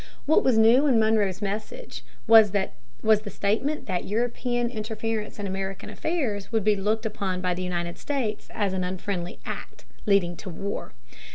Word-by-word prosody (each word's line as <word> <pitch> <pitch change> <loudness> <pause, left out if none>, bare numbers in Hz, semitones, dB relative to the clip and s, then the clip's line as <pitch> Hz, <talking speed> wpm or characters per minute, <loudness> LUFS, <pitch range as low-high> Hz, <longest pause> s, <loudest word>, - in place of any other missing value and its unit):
What 315 - +4
was 255 -4 +3
new 235 +6 +6
in 255 -5 +4
Monroe's 215 -3 +2
message 215 - -5 0.2
was 220 -3 +7
the 200 -2 0 0.6
statement 225 +11 -1
that 185 -3 -2
European 240 +2 -1
interference 220 -1 -3
in 205 - -4
American 195 0 -4
affairs 240 - -2
would 225 -3 +1
be 210 0 +4
looked 215 +3 0
upon 195 -4 -2
by 180 -1 0
the 180 - -4
United 175 -1 -3
States 250 -7 -2
as 200 -3 -1
an 185 -1 -1
"unfriendly 180 -1 -3
act," - - -7 0.2
leading 190 -4 +3
to 190 - -8
war. 195 +4 -5
210 Hz, 160 wpm, -26 LUFS, 190-225 Hz, 0.6 s, was